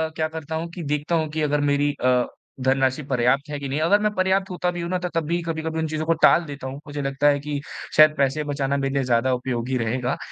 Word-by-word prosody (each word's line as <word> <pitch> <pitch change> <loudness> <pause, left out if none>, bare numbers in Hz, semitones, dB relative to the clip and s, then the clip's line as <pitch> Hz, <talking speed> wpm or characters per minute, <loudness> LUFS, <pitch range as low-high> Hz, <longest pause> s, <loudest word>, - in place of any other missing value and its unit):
क्या 155 -1 0
करता 160 0 -6
हूँ 165 +1 -3
कि 175 -1 -7
देखता 150 +3 -1
हूँ 155 -1 0
कि 155 0 -2
अगर 150 -1 +1
मेरी 145 +1 +2
अ, 125 -1 +3 0.4
धनराशि 130 +2 +2
पर्याप्त 130 +4 +1
है 145 - -3
कि 140 - -5
नहीं। 145 +3 -1
अगर 200 +6 +4
मैं 210 - +1
पर्याप्त 190 +1 +1
होता 180 0 -1
भी 175 -1 -5
हूँ 170 - -4
ना 185 - 0
त 180 - -1
तब 165 - +1
भी 170 +1 0
कभी-कभी 160 0 -3
उन 160 - 0
चीज़ों 155 0 -3
को 165 - +3
टाल 170 - +6
देता 140 -2 -7
हूँ। 135 +2 -6
मुझे 145 0 -4
लगता 135 +1 +1
है 145 -1 +4
कि 145 0 -4 0.4
शायद 155 0 +7
पैसे 140 +2 +1
बचाना 140 -1 -1
मेरे 135 0 -1
लिए 140 -1 +1
ज़्यादा 125 +1 +2
उपयोगी 125 0 -2
रहेगा, 125 +3 -1
145 Hz, 255 wpm, -23 LUFS, 135-160 Hz, 0.4 s, शायद